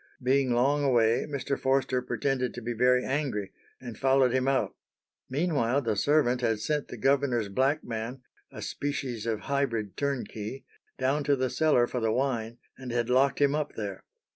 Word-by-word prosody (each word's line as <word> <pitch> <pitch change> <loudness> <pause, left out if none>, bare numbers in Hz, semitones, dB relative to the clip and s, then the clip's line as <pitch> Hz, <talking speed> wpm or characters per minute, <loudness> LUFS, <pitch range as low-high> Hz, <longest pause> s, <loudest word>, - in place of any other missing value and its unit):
Being 130 0 +2
long 135 +5 +2
away, 120 -4 +3
Mr. 140 -1 -2
Forster 130 -1 +1
pretended 130 0 -1
to 120 - -6
be 120 +1 -2
very 125 +2 +3
angry, 130 -8 -2 0.3
and 120 -3 -8
followed 135 -2 +3
him 130 0 +1
out. 135 -1 +1 0.6
Meanwhile 140 -3 +1
the 110 -3 0
servant 125 +1 +2
had 115 -3 +1
sent 150 +6 -1
the 125 - -8
governor's 130 -4 +1
black 135 +9 +1
man, 120 +3 -5 0.3
a - - -8
species 130 -6 -3
of 110 -2 -1
hybrid 115 -8 -1
turnkey, 135 -3 -3 0.3
down 135 +3 +1
to 145 - +3
the 130 -2 -1
cellar 135 -3 +3
for 125 - -3
the 115 -1 +1
wine, 120 -2 -1 0.2
and 130 -2 -6
had 120 0 0
locked 135 +2 +3
him 140 -1 +3
up 150 -1 -2
there. 100 -3 -5
130 Hz, 170 wpm, -28 LUFS, 115-140 Hz, 0.6 s, away